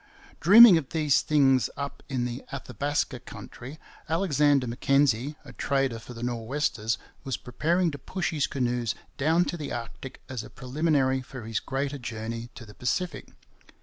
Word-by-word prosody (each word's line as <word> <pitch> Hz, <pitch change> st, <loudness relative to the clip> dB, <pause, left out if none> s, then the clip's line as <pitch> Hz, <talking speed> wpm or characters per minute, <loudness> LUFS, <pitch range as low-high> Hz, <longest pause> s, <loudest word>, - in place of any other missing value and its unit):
Dreaming 200 Hz, 0 st, +9 dB
of 140 Hz, -, -9 dB
these 150 Hz, -3 st, +2 dB
things 135 Hz, -4 st, +3 dB
up 140 Hz, 0 st, -5 dB
in 130 Hz, -3 st, -1 dB
the 125 Hz, +2 st, -5 dB
Athabaska 140 Hz, -1 st, -2 dB
country, 130 Hz, +5 st, -10 dB, 0.3 s
Alexander 150 Hz, -5 st, +3 dB
Mackenzie, 135 Hz, +2 st, +1 dB
a -, -, -11 dB
trader 135 Hz, -4 st, 0 dB
for 120 Hz, +2 st, -11 dB
the 115 Hz, -, -7 dB
Nor'westers, 120 Hz, -1 st, -1 dB, 0.3 s
was 135 Hz, -3 st, -2 dB
preparing 170 Hz, +7 st, 0 dB
to 145 Hz, -, -8 dB
push 180 Hz, +6 st, -3 dB
his 150 Hz, -4 st, 0 dB
canoes 120 Hz, -3 st, -1 dB, 0.2 s
down 160 Hz, +5 st, +3 dB
to 175 Hz, -, -3 dB
the 150 Hz, -3 st, -5 dB
Arctic 120 Hz, +2 st, -7 dB
as 125 Hz, -3 st, -5 dB
a -, -, -11 dB
preliminary 135 Hz, 0 st, 0 dB
to 130 Hz, -1 st, -9 dB
his 110 Hz, 0 st, -2 dB
greater 140 Hz, +1 st, -3 dB
journey 115 Hz, -1 st, -5 dB
to 115 Hz, -, -10 dB
the 105 Hz, -, -13 dB
Pacific. 145 Hz, +7 st, -2 dB
135 Hz, 155 wpm, -27 LUFS, 120-150 Hz, 0.3 s, Dreaming